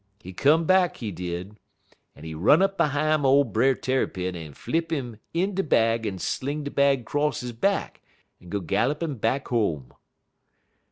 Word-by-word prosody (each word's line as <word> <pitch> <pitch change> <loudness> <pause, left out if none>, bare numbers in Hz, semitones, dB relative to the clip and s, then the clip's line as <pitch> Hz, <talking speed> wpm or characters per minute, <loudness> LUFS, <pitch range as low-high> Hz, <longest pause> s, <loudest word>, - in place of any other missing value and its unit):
He 95 -3 -10
come 155 - +3
back, 185 0 +3
he 110 -4 -5
did, 90 +3 -6 0.6
en - - -14
he 80 0 -6
run 110 - +4
up 195 0 +1
behime 155 -2 +1
ole 140 +1 +5
Brer 125 +3 +2
Tarrypin 95 -10 -2
en 80 -4 -9
flip 165 0 -2
'im 125 -8 -4
in 185 +4 0
de 195 - 0
bag 115 - +2
en 95 -2 -4
sling 145 +10 -3
de 145 - -5
bag 140 -3 +2
'cross 145 +2 -1
he 125 0 -5
back 195 - -1 0.4
en 90 - -14
go 100 +2 -2
gallin' 145 - 0
up 115 - -12
back 130 +5 0
home. 80 - -1
130 Hz, 175 wpm, -25 LUFS, 100-150 Hz, 0.6 s, ole